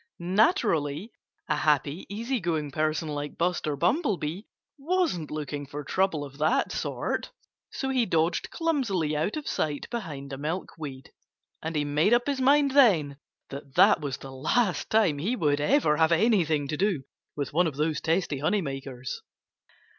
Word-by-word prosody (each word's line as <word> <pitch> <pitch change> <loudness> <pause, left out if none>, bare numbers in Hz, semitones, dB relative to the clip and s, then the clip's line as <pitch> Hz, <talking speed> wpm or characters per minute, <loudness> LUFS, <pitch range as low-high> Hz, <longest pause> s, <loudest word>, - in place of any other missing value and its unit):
Naturally, 180 - +1 0.4
a 150 - +1
happy, 150 +2 +1
easy 235 +5 -2
going 160 -5 -2
person 155 +2 -1
like 145 -1 -5
Buster 170 -4 0
Bumblebee 180 - 0 0.4
wasn't 305 - 0
looking 145 -1 -5
for 145 +2 -6
trouble 165 -2 0
of 140 +1 -13
that 155 +1 +2
sort. - - -2 0.4
So 270 - -3
he 255 -4 +1
dodged 165 0 +1
clumsily 230 - 0
out 160 - -1
of 300 - -6
sight 150 -2 -2
behind 145 - -5
a 135 - -6
milkweed; 150 -4 -5 0.5
and 160 0 -4
he 150 -1 +1
made 150 +10 +3
up 240 - +1
his 280 -2 -1
mind 280 +1 +4
then 180 - +4 0.3
that 140 -1 -9
that - - +6
was 140 -3 -3
the 135 - -10
last 175 - 0
time 200 -10 +3
he 210 - 0
would 145 -8 +1
ever 150 - +3
have 160 0 +3
anything 170 -6 +2
to 155 - -2
do 190 -7 0 0.3
with 145 -1 -4
one 175 +2 +3
of 150 - -4
those 150 +1 0
testy 160 -3 0
honey 190 +7 +1
makers. 135 -3 -6
160 Hz, 160 wpm, -27 LUFS, 145-210 Hz, 0.5 s, that